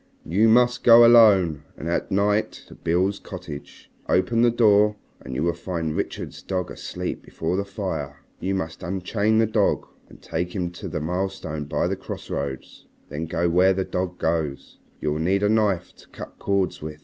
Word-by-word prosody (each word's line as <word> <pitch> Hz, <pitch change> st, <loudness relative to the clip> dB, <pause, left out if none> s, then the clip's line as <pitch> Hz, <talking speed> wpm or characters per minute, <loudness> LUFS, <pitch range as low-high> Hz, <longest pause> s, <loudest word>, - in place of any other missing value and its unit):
"You 105 Hz, +7 st, +3 dB
must 125 Hz, +2 st, +4 dB
go 120 Hz, 0 st, +9 dB
alone 100 Hz, -10 st, +6 dB, 0.2 s
and 80 Hz, -, -6 dB
at 85 Hz, -, -1 dB
night 105 Hz, +2 st, +1 dB, 0.2 s
to -, -, -11 dB
Beale's 90 Hz, +4 st, 0 dB
cottage, 75 Hz, -2 st, -10 dB, 0.2 s
open 115 Hz, +5 st, +2 dB
the 120 Hz, -, +5 dB
door 105 Hz, -3 st, +4 dB, 0.2 s
and 65 Hz, 0 st, -8 dB
you 75 Hz, -, -1 dB
will 85 Hz, 0 st, +1 dB
find 85 Hz, -2 st, -4 dB
Richard's -, -, -4 dB
dog 90 Hz, -2 st, -3 dB
asleep -, -, -5 dB
before 80 Hz, +2 st, -3 dB
the 100 Hz, +1 st, -1 dB
fire. 95 Hz, -8 st, -4 dB, 0.2 s
You 95 Hz, +1 st, -1 dB
must 85 Hz, -4 st, -4 dB
unchain 100 Hz, +4 st, 0 dB
the 115 Hz, -, +4 dB
dog 110 Hz, -2 st, +1 dB, 0.2 s
and -, -, -15 dB
take 85 Hz, +3 st, -4 dB
him 90 Hz, -3 st, -2 dB
to 90 Hz, -, -8 dB
the 75 Hz, -, -4 dB
milestone 90 Hz, -3 st, -3 dB
by 70 Hz, -, -1 dB
the -, -, -1 dB
crossroads. 70 Hz, -1 st, -6 dB, 0.2 s
Then 75 Hz, +3 st, -4 dB
go 85 Hz, +2 st, 0 dB
where 90 Hz, +3 st, +4 dB
the 95 Hz, 0 st, -1 dB
dog 90 Hz, 0 st, -3 dB
goes. 80 Hz, -4 st, -2 dB, 0.2 s
You 75 Hz, -, 0 dB
will 75 Hz, -, -2 dB
need 95 Hz, +5 st, +1 dB
a 105 Hz, -, +3 dB
knife 105 Hz, -5 st, +1 dB
to -, -, -18 dB
cut -, -, -11 dB
cords 100 Hz, -2 st, 0 dB
with. 75 Hz, 0 st, -7 dB
95 Hz, 185 wpm, -24 LUFS, 80-105 Hz, 0.2 s, go